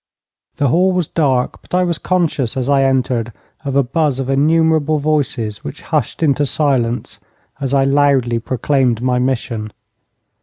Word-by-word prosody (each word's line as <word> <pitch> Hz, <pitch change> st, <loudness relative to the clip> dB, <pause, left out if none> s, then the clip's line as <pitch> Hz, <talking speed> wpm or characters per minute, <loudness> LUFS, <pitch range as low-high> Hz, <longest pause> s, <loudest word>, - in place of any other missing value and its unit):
The 140 Hz, -, +1 dB
hall 185 Hz, +7 st, +3 dB
was 180 Hz, -4 st, 0 dB
dark, 135 Hz, -6 st, 0 dB
but -, -, -5 dB
I 180 Hz, -, +3 dB
was 170 Hz, -3 st, -1 dB
conscious 160 Hz, -10 st, -1 dB
as 130 Hz, -1 st, -1 dB
I 140 Hz, -1 st, +3 dB
entered 125 Hz, -3 st, 0 dB, 0.3 s
of 140 Hz, -2 st, -3 dB
a 140 Hz, -, +4 dB
buzz 140 Hz, +1 st, 0 dB
of 135 Hz, 0 st, -2 dB
innumerable 155 Hz, +1 st, +2 dB
voices, 140 Hz, -8 st, -1 dB
which -, -, -8 dB
hushed 155 Hz, 0 st, -2 dB
into 145 Hz, -1 st, +2 dB
silence 130 Hz, -5 st, -1 dB, 0.4 s
as 135 Hz, -3 st, -3 dB
I 135 Hz, -1 st, +3 dB
loudly 135 Hz, -4 st, +2 dB
proclaimed 125 Hz, 0 st, 0 dB
my 125 Hz, -1 st, +1 dB
mission. 115 Hz, -4 st, -2 dB
135 Hz, 155 wpm, -17 LUFS, 125-155 Hz, 0.4 s, a